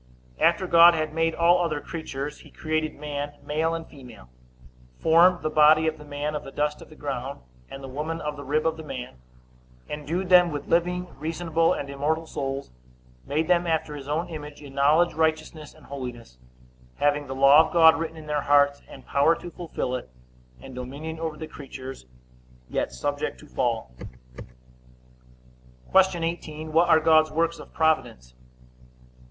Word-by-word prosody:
A. -, -, -2 dB
After 180 Hz, +3 st, +3 dB
God 170 Hz, -1 st, +7 dB
had 155 Hz, -1 st, -2 dB
made 165 Hz, 0 st, 0 dB
all 175 Hz, +1 st, +4 dB
other 155 Hz, -3 st, -1 dB
creatures, 150 Hz, -2 st, -6 dB
he -, -, -15 dB
created 155 Hz, 0 st, -2 dB
man 145 Hz, -1 st, -5 dB
male 160 Hz, +2 st, 0 dB
and 165 Hz, -1 st, -6 dB
female; 125 Hz, -, -14 dB, 0.7 s
formed 170 Hz, +2 st, +4 dB
the 155 Hz, -, 0 dB
body 155 Hz, +1 st, +5 dB
of 160 Hz, -1 st, -1 dB
the -, -, -10 dB
man 145 Hz, +1 st, -4 dB
of 150 Hz, -, -4 dB
the -, -, -9 dB
dust 150 Hz, +1 st, -2 dB
of -, -, -13 dB
the 155 Hz, -, -14 dB
ground, 140 Hz, -2 st, -5 dB, 0.3 s
and 135 Hz, -, -9 dB
the -, -, -6 dB
woman 150 Hz, +5 st, -4 dB
of 150 Hz, -1 st, -4 dB
the 140 Hz, -, -8 dB
rib 150 Hz, +3 st, 0 dB
of 160 Hz, 0 st, 0 dB
the 160 Hz, -, -8 dB
man, 125 Hz, -, -7 dB, 0.7 s
endued 165 Hz, +5 st, -4 dB
them 180 Hz, -2 st, +6 dB
with 145 Hz, -1 st, -5 dB
living, 180 Hz, +1 st, +1 dB
reasonable, 165 Hz, +1 st, 0 dB
and 140 Hz, -, -4 dB
immortal 150 Hz, +4 st, -2 dB
souls; 135 Hz, -, -5 dB, 0.6 s
made 155 Hz, +3 st, 0 dB
them 175 Hz, -1 st, +2 dB
after 160 Hz, -2 st, -1 dB
his 140 Hz, -2 st, -9 dB
own 160 Hz, +4 st, -1 dB
image, 150 Hz, -3 st, -8 dB
in 140 Hz, -2 st, -12 dB
knowledge, 150 Hz, +5 st, +3 dB
righteousness, 155 Hz, -1 st, -1 dB
and 155 Hz, -, -18 dB
holiness; 125 Hz, -, -8 dB, 0.6 s
having 145 Hz, 0 st, +1 dB
the 135 Hz, -, -5 dB
law 140 Hz, +4 st, +6 dB
of -, -, -12 dB
God 160 Hz, -1 st, +7 dB
written 160 Hz, 0 st, -4 dB
in 155 Hz, -, -10 dB
their 150 Hz, -1 st, -1 dB
hearts, 145 Hz, 0 st, +3 dB
and -, -, -13 dB
power 145 Hz, +4 st, +3 dB
to 175 Hz, -, -9 dB
fulfill 165 Hz, -8 st, -4 dB
it, 125 Hz, -, -5 dB, 0.5 s
and 130 Hz, -, -11 dB
dominion 140 Hz, +6 st, -7 dB
over 160 Hz, -2 st, -4 dB
the 160 Hz, -, -6 dB
creatures; 135 Hz, -, -10 dB, 0.6 s
yet -, -, -2 dB
subject 60 Hz, 0 st, -3 dB
to -, -, -14 dB
fall. 60 Hz, -, -2 dB, 2.0 s
Q. 190 Hz, -3 st, +4 dB
18. 160 Hz, -2 st, -4 dB
What 170 Hz, +2 st, +4 dB
are 160 Hz, -1 st, +6 dB
God's 155 Hz, 0 st, +4 dB
works 165 Hz, +1 st, -1 dB
of -, -, -12 dB
providence? 110 Hz, -, 0 dB
155 Hz, 175 wpm, -25 LUFS, 140-165 Hz, 2.0 s, God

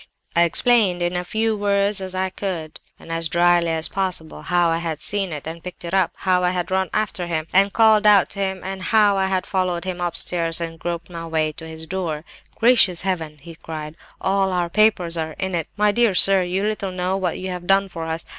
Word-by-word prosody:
I 170 Hz, 0 st, +5 dB
explained 185 Hz, -1 st, +2 dB
in 175 Hz, +1 st, -1 dB
as 180 Hz, 0 st, -3 dB
few 220 Hz, +2 st, +1 dB
words 200 Hz, -1 st, 0 dB
as 185 Hz, 0 st, -6 dB
I 185 Hz, 0 st, -1 dB
could, 175 Hz, -5 st, -5 dB, 0.2 s
and 165 Hz, -, -12 dB
as 165 Hz, 0 st, -1 dB
drily 175 Hz, 0 st, +3 dB
as 160 Hz, -1 st, +1 dB
possible, 185 Hz, -5 st, -3 dB
how 175 Hz, -1 st, +2 dB
I 165 Hz, 0 st, 0 dB
had 165 Hz, -3 st, -4 dB
seen 195 Hz, +2 st, -2 dB
it 150 Hz, -2 st, -6 dB
and 165 Hz, +1 st, -7 dB
picked 180 Hz, -1 st, -9 dB
it 170 Hz, -, -6 dB
up; 190 Hz, -3 st, +2 dB
how 185 Hz, -1 st, +1 dB
I 180 Hz, -, +3 dB
had 180 Hz, 0 st, -3 dB
run 190 Hz, 0 st, +1 dB
after 205 Hz, -4 st, -2 dB
him, 160 Hz, -2 st, -2 dB
and 195 Hz, +1 st, +4 dB
called 220 Hz, 0 st, +4 dB
out 205 Hz, -3 st, +6 dB
to 200 Hz, -, -7 dB
him, 190 Hz, -1 st, -2 dB
and 190 Hz, 0 st, -5 dB
how 210 Hz, 0 st, +3 dB
I 190 Hz, 0 st, +1 dB
had 190 Hz, -1 st, -1 dB
followed 180 Hz, -3 st, -1 dB
him 180 Hz, -1 st, -4 dB
upstairs 170 Hz, -1 st, 0 dB
and 165 Hz, -1 st, -5 dB
groped 170 Hz, +1 st, -5 dB
my 165 Hz, -1 st, -6 dB
way 160 Hz, -1 st, 0 dB
to 160 Hz, +1 st, -10 dB
his 160 Hz, 0 st, -8 dB
door. 165 Hz, -4 st, -3 dB, 0.3 s
"'Gracious 225 Hz, -7 st, +4 dB
Heaven!' 165 Hz, -5 st, -3 dB
he 170 Hz, +2 st, -10 dB
cried, 155 Hz, -1 st, -8 dB, 0.2 s
'all 195 Hz, 0 st, +1 dB
our 175 Hz, -2 st, -1 dB
papers 190 Hz, -5 st, +3 dB
are 160 Hz, -1 st, -3 dB
in 190 Hz, +2 st, -3 dB
it! 165 Hz, -3 st, -1 dB
My 210 Hz, 0 st, +3 dB
dear 225 Hz, -2 st, +2 dB
sir, 195 Hz, +1 st, +5 dB
you 180 Hz, +2 st, -1 dB
little 210 Hz, -2 st, -2 dB
know 185 Hz, +1 st, -1 dB
what 185 Hz, -3 st, -2 dB
you 185 Hz, 0 st, -5 dB
have 180 Hz, -1 st, -6 dB
done 195 Hz, +1 st, +4 dB
for 165 Hz, -3 st, -6 dB
us. 160 Hz, 0 st, -4 dB
180 Hz, 230 wpm, -21 LUFS, 165-195 Hz, 0.3 s, out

